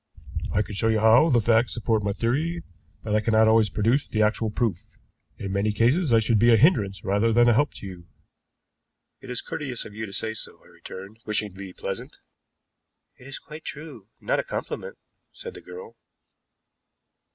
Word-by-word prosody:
I 105 Hz, -, +2 dB
can 105 Hz, -, -9 dB
show 105 Hz, +3 st, 0 dB
you 110 Hz, -1 st, +3 dB
how 115 Hz, +9 st, +6 dB
the 125 Hz, -5 st, +4 dB
facts 115 Hz, +1 st, +2 dB
support 110 Hz, -2 st, 0 dB
my 100 Hz, 0 st, -1 dB
theory, 150 Hz, +11 st, -1 dB, 0.4 s
but 105 Hz, -, -3 dB
I 105 Hz, -, +4 dB
cannot 110 Hz, 0 st, +3 dB
always 110 Hz, -1 st, +4 dB
produce 115 Hz, +9 st, +1 dB
the 110 Hz, -1 st, +1 dB
actual 110 Hz, +1 st, +1 dB
proof. 105 Hz, -5 st, -3 dB, 0.4 s
In 100 Hz, -, -5 dB
many 100 Hz, +2 st, +1 dB
cases 125 Hz, -, +2 dB
I 115 Hz, -, +6 dB
should 110 Hz, -1 st, +2 dB
be 120 Hz, +2 st, +5 dB
a 115 Hz, -, +7 dB
hindrance 105 Hz, -, +3 dB
rather 105 Hz, +4 st, +2 dB
than 120 Hz, +1 st, +5 dB
a 120 Hz, -, +6 dB
help 145 Hz, +6 st, +1 dB
to -, -, -9 dB
you." 90 Hz, -3 st, -10 dB, 1.1 s
"It -, -, -12 dB
is 125 Hz, -1 st, -3 dB
courteous 130 Hz, -6 st, -4 dB
of 105 Hz, -, -10 dB
you 110 Hz, +1 st, -5 dB
to -, -, -10 dB
say 110 Hz, +3 st, -2 dB
so," 110 Hz, -, -7 dB
I -, -, -20 dB
returned, 100 Hz, +4 st, -11 dB
wishing 105 Hz, -1 st, -1 dB
to 95 Hz, -, -14 dB
be 100 Hz, -1 st, -7 dB
pleasant. -, -, -6 dB, 1.0 s
"It 125 Hz, -, -14 dB
is 135 Hz, -, -6 dB
quite 155 Hz, +1 st, -11 dB
true, 145 Hz, -9 st, -9 dB
not -, -, 0 dB
a -, -, -1 dB
compliment," -, -, -5 dB, 0.4 s
said 465 Hz, -1 st, -8 dB
the -, -, -11 dB
girl. 460 Hz, 0 st, -11 dB
110 Hz, 195 wpm, -25 LUFS, 105-125 Hz, 1.1 s, a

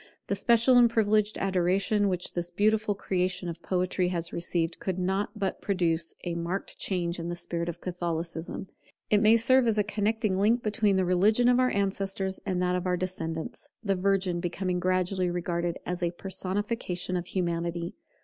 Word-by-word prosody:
The 200 Hz, -, -1 dB
special 235 Hz, +4 st, +5 dB
and 240 Hz, -1 st, +6 dB
privileged 215 Hz, -1 st, +2 dB
adoration 195 Hz, +2 st, +1 dB
which 180 Hz, -1 st, -2 dB
this 175 Hz, 0 st, -3 dB
beautiful 210 Hz, +3 st, +1 dB
creation 180 Hz, -1 st, -1 dB
of 170 Hz, 0 st, -6 dB
Poetry 185 Hz, 0 st, 0 dB
has 170 Hz, -1 st, -1 dB
received, 170 Hz, -1 st, -1 dB
could 190 Hz, -6 st, -2 dB
not 190 Hz, +4 st, -1 dB
but 195 Hz, -3 st, -2 dB
produce 170 Hz, -4 st, 0 dB
a 175 Hz, -, -2 dB
marked 170 Hz, +3 st, -4 dB
change 175 Hz, -2 st, -1 dB
in 170 Hz, +1 st, -4 dB
the 175 Hz, -, -3 dB
spirit 170 Hz, 0 st, -3 dB
of 170 Hz, 0 st, -7 dB
Catholicism. 170 Hz, 0 st, -4 dB, 0.4 s
It 210 Hz, -1 st, +5 dB
may 220 Hz, +2 st, +6 dB
serve 255 Hz, +2 st, +4 dB
as 220 Hz, -2 st, +2 dB
a 210 Hz, -, +4 dB
connecting 210 Hz, -1 st, 0 dB
link 230 Hz, +4 st, +3 dB
between 210 Hz, -1 st, +2 dB
the 190 Hz, -1 st, +2 dB
religion 205 Hz, +7 st, +3 dB
of 245 Hz, 0 st, +5 dB
our 255 Hz, 0 st, +4 dB
ancestors 195 Hz, -1 st, -1 dB
and 185 Hz, -2 st, 0 dB
that 180 Hz, 0 st, +1 dB
of 180 Hz, 0 st, -2 dB
our 180 Hz, 0 st, +1 dB
descendants, 165 Hz, -3 st, -4 dB, 0.2 s
the 200 Hz, -2 st, +1 dB
Virgin 190 Hz, -2 st, +1 dB
becoming 180 Hz, +1 st, -2 dB
gradually 185 Hz, 0 st, +1 dB
regarded 175 Hz, 0 st, -2 dB
as 180 Hz, 0 st, -3 dB
a 175 Hz, -, +1 dB
personification 185 Hz, +1 st, -3 dB
of 175 Hz, 0 st, -3 dB
Humanity. 170 Hz, -1 st, -2 dB
185 Hz, 175 wpm, -28 LUFS, 175-205 Hz, 0.4 s, and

